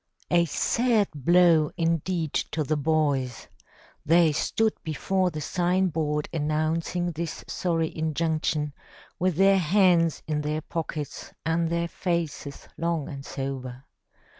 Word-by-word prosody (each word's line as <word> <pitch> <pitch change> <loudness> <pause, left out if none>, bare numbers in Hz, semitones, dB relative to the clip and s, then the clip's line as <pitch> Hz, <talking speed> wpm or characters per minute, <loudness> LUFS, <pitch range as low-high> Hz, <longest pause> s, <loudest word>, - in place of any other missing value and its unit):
A 170 -1 +4
sad 225 - +1
blow 165 +1 +4
indeed 165 -1 0
to 155 - -1
the 155 +2 0
boys! 145 -5 0 0.6
They 165 0 +5
stood 220 +8 +1
before 185 +4 0
the 155 -3 -6
sign 180 +4 +1
board 150 -2 -1
announcing 160 +3 -1
this 165 0 -5
sorry 165 -3 -1
injunction, 155 -1 -1 0.5
with 185 -1 +1
their 195 +2 +5
hands 175 -2 +3
in 150 -1 -1
their 150 +1 -2
pockets 160 -2 -5
and 165 0 +1
their 170 0 0
faces 170 -6 -3
long 165 -3 -1
and 140 -1 -7
sober. 135 -2 -5
160 Hz, 120 wpm, -26 LUFS, 150-175 Hz, 0.6 s, They